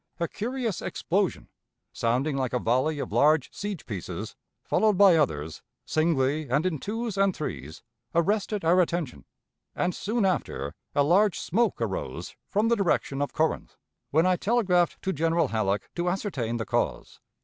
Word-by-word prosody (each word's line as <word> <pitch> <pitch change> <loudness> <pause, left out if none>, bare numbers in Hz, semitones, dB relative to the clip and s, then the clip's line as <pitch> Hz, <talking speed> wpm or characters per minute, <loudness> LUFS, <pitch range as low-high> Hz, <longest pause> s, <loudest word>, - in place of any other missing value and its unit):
a 170 - 0
curious 235 -1 -3
explosion, 195 +1 -1 0.5
sounding 130 +6 0
like 130 -3 -1
a - - +3
volley 130 +7 +1
of - - -4
large 150 -1 +3
siege 205 -5 -5
pieces, 100 -6 -6 0.3
followed 215 -3 +2
by 195 -3 +7
others, 80 - -1 0.2
singly, 155 -2 +1
and 145 +7 +1
in 165 -5 0
twos 220 - -3
and 195 -2 +3
threes, 75 - -6 0.3
arrested 200 +2 +1
our 180 +3 +5
attention, 170 -5 -2 0.5
and 180 - 0
soon 215 +1 -1
after 75 - -1 0.2
a 145 - +4
large 185 +5 +3
smoke 230 +6 0
arose - - -4
from 210 +2 +2
the 235 - +4
direction 170 -8 0
of 145 - -1
Corinth, 160 +1 -1 0.3
when 160 +4 +3
I 185 -1 +3
telegraphed 190 -6 +2
to 190 - 0
General 165 -1 +1
Halleck 105 -3 -1
to 175 0 -1
ascertain 140 - -2
the 110 - -3
cause. - - -2
170 Hz, 155 wpm, -27 LUFS, 135-200 Hz, 0.5 s, by